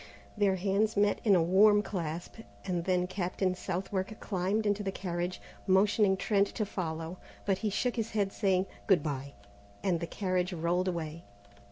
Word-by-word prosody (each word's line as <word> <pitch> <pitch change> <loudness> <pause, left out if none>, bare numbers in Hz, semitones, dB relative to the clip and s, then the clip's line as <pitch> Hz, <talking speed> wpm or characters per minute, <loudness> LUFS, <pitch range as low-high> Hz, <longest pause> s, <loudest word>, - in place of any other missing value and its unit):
Their 200 -3 +3
hands 200 +3 +1
met 205 0 +3
in 205 -4 +5
a 170 - +4
warm 205 +4 +5
clasp, 170 -3 -4 0.3
and 175 -3 -1
then 180 -1 +2
Captain 185 0 -1
Southwark 190 +3 -3
climbed 200 +2 -1
into 205 0 +1
the 195 -1 -2
carriage, 180 -1 -3 0.3
motioning 195 +1 +4
Trent 200 0 +2
to 215 - 0
follow; 165 -2 -4 0.3
but 195 -2 +1
he 215 - 0
shook 245 +5 -1
his 225 -1 -1
head 200 -2 0
saying, 190 -3 +2 0.2
"Good 190 -8 +4
bye!" 140 -2 -4 0.5
and 180 -4 +1
the 170 - -4
carriage 185 -1 -1
rolled 175 +2 0
away. 165 -2 -3
190 Hz, 165 wpm, -31 LUFS, 175-205 Hz, 0.5 s, in